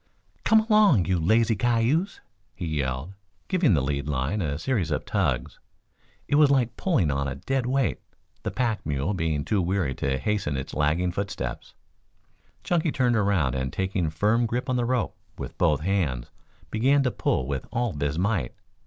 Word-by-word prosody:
"Come 220 0 +5
along, 210 - +4
you 90 -2 +1
lazy 110 +6 +3
cayuse," 120 - +1 0.3
he 90 - -5
yelled, 70 +1 -2 0.3
giving 175 - +3
the 70 - +1
lead 70 +1 -2
line 75 +8 -1
a 75 -4 -2
series 100 -5 -1
of 75 - -2
tugs. - - -1 0.7
It 145 - +2
was 150 -2 +6
like 130 -4 +2
pulling 130 - +1
on 70 0 -1
a 70 - -3
dead 130 - -2
weight, 135 -1 +1 0.4
the - - -2
pack 115 -4 -1
mule 75 +5 -1
being 80 -5 -1
too 105 -3 +1
weary 90 -5 0
to 65 +1 -1
hasten 95 -5 -1
its 65 - -5
lagging 80 +4 +1
footsteps. 90 -11 -5 0.9
Chunky 170 -3 +1
turned 125 -3 +2
around 100 - +2
and 65 -1 -2
taking 95 -2 -1
firm 110 +8 +1
grip 125 +3 -2
on - - +1
the 120 -1 +1
rope 125 -1 -1 0.2
with - - -7
both 75 -5 +3
hands 80 -10 -1 0.4
began 135 +6 +3
to 125 - +1
pull 100 - 0
with 70 -1 -4
all 120 -2 -1
his 70 +1 -2
might. 95 - 0
95 Hz, 170 wpm, -26 LUFS, 75-120 Hz, 0.9 s, was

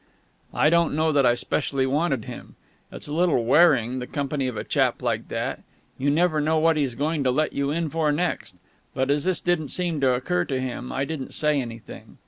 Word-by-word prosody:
I 150 - +3
don't 170 -3 +2
know 155 +1 +2
that 140 -4 +3
I 120 - +4
specially 135 +1 -1
wanted 135 -3 0
him. - - -10 0.4
It's - - -7
a 145 - -5
little 165 -8 +2
wearing, 130 -4 +4
the 125 - -6
company 140 -2 -2
of 125 -4 -4
a - - -3
chap - - 0
like - - -1
that. - - -3 0.4
You 140 +2 +1
never 155 +1 +2
know 160 +2 +1
what 165 +1 +3
he's 140 -5 -1
going 150 +2 -1
to 130 - +2
let 150 +5 0
you 140 0 -1
in 165 +2 -1
for 155 0 0
next. 170 +4 -2 0.4
But, 130 +1 +1
as 145 +2 0
this 185 -1 0
didn't 175 -4 0
seem 170 -2 -2
to 130 -2 +3
occur 90 -8 -1
to 130 - -2
him, 125 -1 -5
I 135 +1 -1
didn't 140 -2 -6
say 150 -2 +1
anything. 115 -2 -10
145 Hz, 215 wpm, -24 LUFS, 130-160 Hz, 0.4 s, I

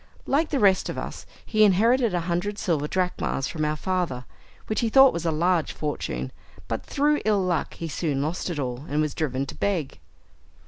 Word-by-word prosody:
Like 300 +4 +1
the 280 - 0
rest 195 -3 +3
of - - -4
us, - - -6 0.2
he 215 -1 +3
inherited 225 +4 +4
a 175 - +1
hundred 175 +4 -2
silver 155 -8 0
drachmas 180 -6 -1
from 155 -2 -3
our 150 0 0
father, 165 -7 -2 0.4
which 215 - -1
he 230 - +1
thought 270 +3 +7
was 170 0 -2
a - - +2
large 170 +1 +1
fortune, 65 - -3 0.4
but - - -3
through 295 +1 +1
ill 210 -3 +2
luck, 180 -3 -1
he 165 - -5
soon 150 -3 -1
lost 155 +6 -2
it 170 - -3
all, 130 0 -3
and 150 +2 0
was 155 -1 0
driven 135 -3 -1
to - - -8
beg. 180 -9 -2
175 Hz, 195 wpm, -25 LUFS, 150-205 Hz, 0.4 s, thought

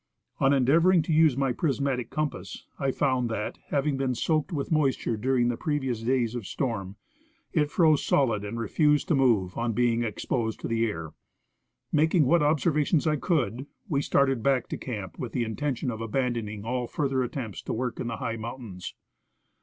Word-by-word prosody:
On 135 - +4
endeavoring 160 +6 +4
to 160 - -1
use 155 -4 +4
my 135 -2 +1
prismatic 135 -3 -1
compass, 155 -1 -4
I 135 - +1
found 130 -3 +1
that, 105 -2 -4
having 140 -1 0
been 130 -2 0
soaked 155 +5 0
Avith 150 -5 -3
moisture 140 -6 +1
during 125 +2 +1
the 120 -1 -1
pre 150 -1 -1
vious 125 -5 -3
days 120 -2 +1
of 120 -5 -5
storm, 100 -7 -3 0.6
it 150 -3 +2
froze 155 -2 +3
solid 115 -7 +2
and 105 +3 -5
refused 150 - +2
to - - +4
move, 115 -10 +2
on 115 -1 0
being 120 0 +2
exposed 110 +1 -2
to - - -3
the 115 0 +1
air. 85 -7 -5 0.8
Making 155 +1 +3
what 170 +5 +4
observations 150 +1 +2
I 155 -1 +2
could, 135 - -1 0.2
we 140 -4 +1
started 135 -4 +2
back 135 -1 +1
to - - -3
camp 105 -7 -6
with 120 -4 -5
the 125 - 0
intention 125 +2 -2
of 110 -1 -6
abandoning 115 -3 -2
all 125 +1 -2
further 135 -2 0
attempts 120 -4 -4
to - - -4
work 125 0 -3
in - - -3
the 115 - -3
high 115 0 -3
mountains. 115 -5 -7
130 Hz, 180 wpm, -27 LUFS, 115-145 Hz, 0.8 s, On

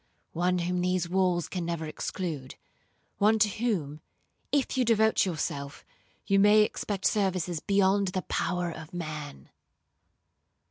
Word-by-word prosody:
'—'One 180 +2 +1
whom 180 +1 -1
these 180 -1 0
walls 180 -1 +1
can 180 -2 -4
never 170 -1 -3
exclude. 155 -3 -5 0.6
One 215 +2 +4
to 215 0 +4
whom, 190 -9 -2 0.5
if 280 -2 +1
you 260 - +2
devote 220 -3 +3
yourself, 140 -4 -4 0.4
you 195 0 +3
may 210 +2 +6
expect 205 -2 -3
services 185 -5 +1
beyond 200 +1 +2
the 185 0 -2
power 180 -1 -1
of 160 +1 -10
man.' 150 - -6
180 Hz, 130 wpm, -28 LUFS, 165-200 Hz, 0.6 s, may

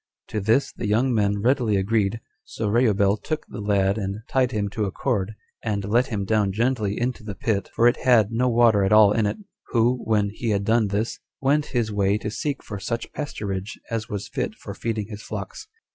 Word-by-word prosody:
To 110 - -2
this 110 +7 +2
the 110 - -4
young 120 +5 +2
men 100 -2 +1
readily 120 -5 +2
agreed; 105 +2 0 0.2
so 110 - -4
Reubel 105 -3 +3
took 155 +9 -4
the - - -7
lad 100 0 +1
and 100 +1 -4
tied 130 -2 +1
him 105 -3 -1
to 105 +1 -2
a 95 - -3
cord, 110 -3 -1 0.3
and 100 -3 -1
let 120 +5 +2
him 100 -5 -2
down 105 -1 +2
gently 110 -2 0
into 120 -1 -2
the 105 -2 -6
pit, 110 -6 -1
for 120 - +5
it 120 - +3
had 115 -5 +4
no 125 +3 +1
water 115 -4 +4
at 95 - +1
all 105 -1 +7
in 105 -1 +2
it; - - -2 0.3
who, 120 +1 +2
when 105 -2 +1
he 115 +2 -3
had 100 -1 +1
done 110 +1 +3
this, 105 +3 -2 0.2
went 145 +2 +2
his 110 -2 0
way 100 0 +2
to 105 - -4
seek 140 +4 -3
for 105 -2 -6
such 115 +5 -4
pasturage 105 -9 -4 0.2
as 115 -1 -2
was 100 -1 -4
fit - - -3
for - - -8
feeding 110 -2 -3
his 105 -1 -8
flocks. 100 -3 -7
110 Hz, 210 wpm, -24 LUFS, 100-120 Hz, 0.3 s, all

